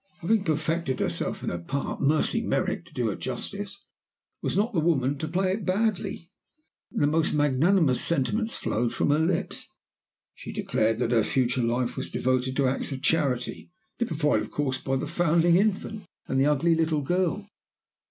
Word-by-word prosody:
Having 205 +3 +1
perfected 160 -2 -1
herself - - -2
in - - -1
her 85 - -3
part, 135 +11 -4
Mercy 155 +10 +2
Merrick, 185 -6 -1
to 170 - -19
do 120 -4 0
her 100 - -2
justice, 200 +10 -6 0.6
was - - -1
not 220 +4 +1
the 175 - +2
woman 145 -4 +2
to 155 - -2
play 185 +3 0
it 200 +2 -2
badly. 190 -3 -1 0.6
The - - 0
most 155 +2 +1
magnanimous 145 +1 +3
sentiments 210 - 0
flowed 115 +2 -1
from - - +2
her 150 - +3
lips. 165 +2 -1 0.7
She - - -9
declared 110 0 0
that 115 - 0
her 115 -3 +4
future 125 +1 +1
life 120 +1 0
was - - -4
devoted 130 0 0
to 140 -1 +2
acts 135 +3 -1
of 135 -1 -5
charity, 140 -6 0 0.3
typified, 160 -10 +1
of - - -6
course, 130 -3 -1
by 135 - -1
the 135 - -1
foundling 170 +1 +3
infant 205 0 -1 0.2
and 135 0 +1
the 140 - +4
ugly 150 +3 +3
little 160 -2 +1
girl. 180 +6 0
155 Hz, 170 wpm, -26 LUFS, 130-180 Hz, 0.7 s, her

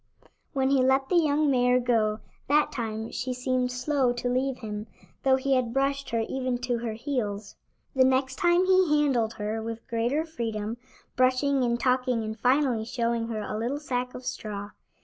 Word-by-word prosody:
When 265 -1 +1
he 275 -2 +4
let 265 +1 +2
the - - +1
young 305 -3 +3
mare 250 -1 +3
go 225 -3 +1 0.3
that 295 +2 +3
time 220 -2 -4
she 250 +1 -3
seemed 250 0 0
slow 255 0 +1
to 245 0 -2
leave 260 +1 0
him, 210 -1 -6 0.3
though 265 -1 +4
he 270 +1 0
had 250 -3 +1
brushed 275 0 0
her 230 -1 0
even 255 -2 -1
to 245 -2 0
her 230 -2 -3
heels. 215 -5 -3 0.4
The 260 - +5
next 260 0 +1
time 350 +1 +3
he 370 -5 +4
handled 245 -6 +1
her 215 +1 -3
with 230 0 -6
greater 240 +7 0
freedom, 230 -7 -4 0.4
brushing 260 +2 +2
and 235 -1 +1
talking 250 -2 +1
and 220 0 -4
finally 250 -2 +2
showing 235 -1 -1
her 220 -2 -3
a 210 - -4
little 250 +6 -2
sack 250 -3 -3
of 250 - -8
straw. 205 -3 -5
250 Hz, 180 wpm, -27 LUFS, 230-270 Hz, 0.4 s, The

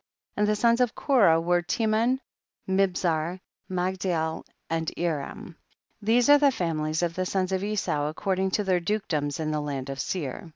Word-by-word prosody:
25. - - -3
And 210 0 +3
the 210 - -1
sons 235 +1 +3
of 245 -3 +1
Korah 205 - +4
were 175 +1 +2
Teman, 225 +5 +1 0.5
Mibzar, 180 -3 0 0.3
Magdiel 180 -3 -1 0.2
and 165 0 -1
Eram; 165 0 -3 0.5
these 230 +4 +3
are 290 0 +7
the 290 - +5
famihes 160 - -1
of 170 -1 0
the 185 +1 -2
sons 185 -1 -1
of 190 0 -1
Esau 195 -8 -1
according 190 +4 -1
to 210 +2 0
their 185 -2 +2
dukedoms 165 -7 -2
in 155 -1 -1
the 150 -1 -1
land 140 -2 -4
of 135 - -6
Seir. 155 +1 -4
180 Hz, 170 wpm, -26 LUFS, 160-210 Hz, 0.5 s, are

